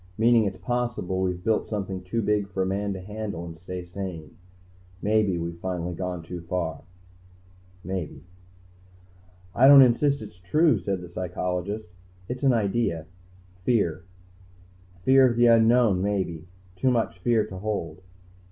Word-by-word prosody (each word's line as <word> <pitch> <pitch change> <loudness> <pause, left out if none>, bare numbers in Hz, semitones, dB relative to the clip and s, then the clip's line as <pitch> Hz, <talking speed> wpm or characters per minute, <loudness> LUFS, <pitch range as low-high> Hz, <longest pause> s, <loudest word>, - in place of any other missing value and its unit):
Meaning 115 0 +4
it's 95 -2 -3
possible 120 -7 -2
we've 90 -1 -2
built 110 +1 0
something 95 -3 -3
too 110 +5 -2
big 105 -1 0
for 95 -1 -1
a - - -1
man 100 +2 -1
to 95 - -7
handle 105 -3 -5
and 85 -1 -8
stay 90 +2 -7
sane. 90 -4 -7 0.6
Maybe 105 -3 +1
we've 85 0 -5
finally 90 -1 -3
gone 90 -1 -4
too 85 +1 -7
far." 85 -3 -3 1.0
"Maybe." 95 -2 -5 1.3
"I 130 +5 +5
don't 140 -1 +10
insist 140 +3 +2
it's 90 - -12
true," 150 - +3
said 95 -2 -3
the 90 - -8
psychologist. 90 +2 -4 0.4
"It's 125 +1 -5
an 135 -2 +4
idea. 105 -7 0 0.5
Fear. 90 -4 0 1.0
Fear 130 +2 +6
of 120 - -2
the 120 +1 +4
unknown, 115 -4 +5
maybe. 95 -5 -2 0.3
Too 130 +8 +1
much 115 -6 0
fear 110 +2 +2
to 95 -3 -9
hold." 100 -4 -4
95 Hz, 145 wpm, -26 LUFS, 90-115 Hz, 1.3 s, don't